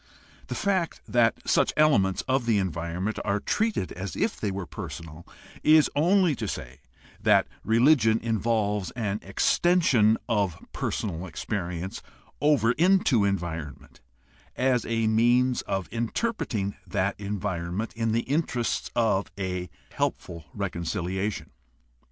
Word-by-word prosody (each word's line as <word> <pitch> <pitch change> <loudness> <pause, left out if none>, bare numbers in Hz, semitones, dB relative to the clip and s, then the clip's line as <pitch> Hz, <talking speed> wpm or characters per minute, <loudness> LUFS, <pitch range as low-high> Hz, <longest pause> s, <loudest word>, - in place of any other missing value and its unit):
The - - -4
fact 190 -4 0
that 115 -2 +2
such - - +3
elements 120 -12 +3
of 130 -2 +1
the 110 -3 +3
environment 90 +2 -2
are 100 0 0
treated 215 - -1
as 95 -2 -6
if - - -1
they 105 - -1
were 95 -1 -4
personal 80 0 -8 0.3
is 155 0 +5
only 175 +2 +4
to - - -3
say 65 +2 -6 0.4
that - - +4 0.2
religion 115 -1 +4
involves 110 -3 0
an 105 -4 -2
extension 115 - +3
of 100 -7 0 0.2
personal 95 -3 -3
experience 90 +1 -4 0.4
over 140 -7 +4
into 160 - +3
environment 85 -7 -4 0.5
as 125 -2 +1
a 115 -1 0
means 120 +3 +3
of 95 -2 -2
interpreting 115 - -2
that 100 +2 0
environment 100 0 -3
in 115 -1 -1
the 115 +1 +2
interests 130 -4 -1
of 110 -4 +1
a 90 -2 -3 0.2
helpful 85 -3 -3
reconciliation. 95 +1 -3
105 Hz, 120 wpm, -26 LUFS, 95-125 Hz, 0.5 s, is